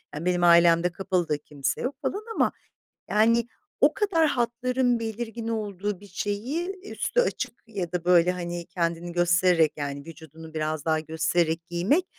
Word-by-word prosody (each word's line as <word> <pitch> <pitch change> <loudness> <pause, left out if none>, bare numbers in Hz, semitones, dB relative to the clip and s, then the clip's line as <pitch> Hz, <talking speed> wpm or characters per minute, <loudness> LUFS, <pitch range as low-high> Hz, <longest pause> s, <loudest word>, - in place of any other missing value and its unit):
Yani, 160 +4 -5
benim 180 -1 +1
ailemde 170 0 +6
kapalı 185 -3 -1
da 150 - +1
kimse 145 -2 -3
yok 260 +2 -2
falan 405 +8 -2
ama, - - +2 0.6
yani, 230 +2 +3 0.3
o - - +5
kadar 340 -6 +2
hatların 245 0 +1
belirgin 225 0 -4
olduğu 205 -3 -3
bir 205 - -13
şeyi, 220 - -3 0.2
eee, 405 - -10
üstü - - 0
açık 255 - -1
ya 190 -6 -4
da, 175 -1 -2
böyle, 180 0 +5
hani, 175 -1 -5
kendini 170 0 -2
göstererek, 175 -2 +3
yani, 140 -1 -4
vücudunu 160 0 -12
biraz 155 -1 -2
daha 160 -1 +1
göstererek 160 +1 0
giymek 190 - +1
180 Hz, 160 wpm, -26 LUFS, 165-230 Hz, 0.6 s, ailemde